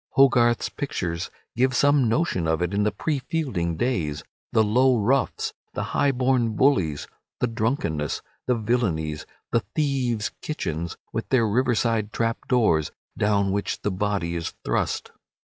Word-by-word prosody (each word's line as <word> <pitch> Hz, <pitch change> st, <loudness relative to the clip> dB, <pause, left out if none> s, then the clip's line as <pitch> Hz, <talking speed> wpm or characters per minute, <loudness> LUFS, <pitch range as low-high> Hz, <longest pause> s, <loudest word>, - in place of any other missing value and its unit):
Hogarth's 120 Hz, -6 st, +4 dB
pictures 90 Hz, -, -3 dB, 0.3 s
give 130 Hz, +1 st, +2 dB
some 145 Hz, -3 st, +4 dB
notion 110 Hz, -, +1 dB
of 80 Hz, +2 st, +1 dB
it 90 Hz, +2 st, -2 dB
in 100 Hz, -, +1 dB
the 105 Hz, 0 st, +2 dB
pre 145 Hz, +8 st, -1 dB
Fielding 115 Hz, -, -2 dB
days, 80 Hz, -, -1 dB, 0.3 s
the 110 Hz, -, +4 dB
low 125 Hz, +4 st, +4 dB
roughs, 125 Hz, +6 st, +1 dB, 0.2 s
the -, -, -1 dB
high 140 Hz, -1 st, +3 dB
born 125 Hz, -3 st, +1 dB
bullies, 95 Hz, -, +2 dB, 0.3 s
the -, -, +2 dB
drunkenness, 110 Hz, -, -1 dB, 0.2 s
the 125 Hz, -, +3 dB
villainies, 100 Hz, -10 st, -1 dB, 0.2 s
the 115 Hz, -, +4 dB, 0.2 s
thieves' 130 Hz, -7 st, 0 dB
kitchens 85 Hz, -, -3 dB, 0.2 s
with -, -, -3 dB
their 120 Hz, -4 st, +3 dB
riverside 115 Hz, -2 st, +1 dB
trapdoors, 115 Hz, -, +1 dB, 0.3 s
down 100 Hz, -1 st, +2 dB
which 100 Hz, +1 st, -2 dB
the 105 Hz, -, 0 dB
body 95 Hz, -3 st, -1 dB
is 85 Hz, -1 st, -4 dB
thrust. -, -, -1 dB
110 Hz, 140 wpm, -25 LUFS, 90-130 Hz, 0.3 s, Hogarth's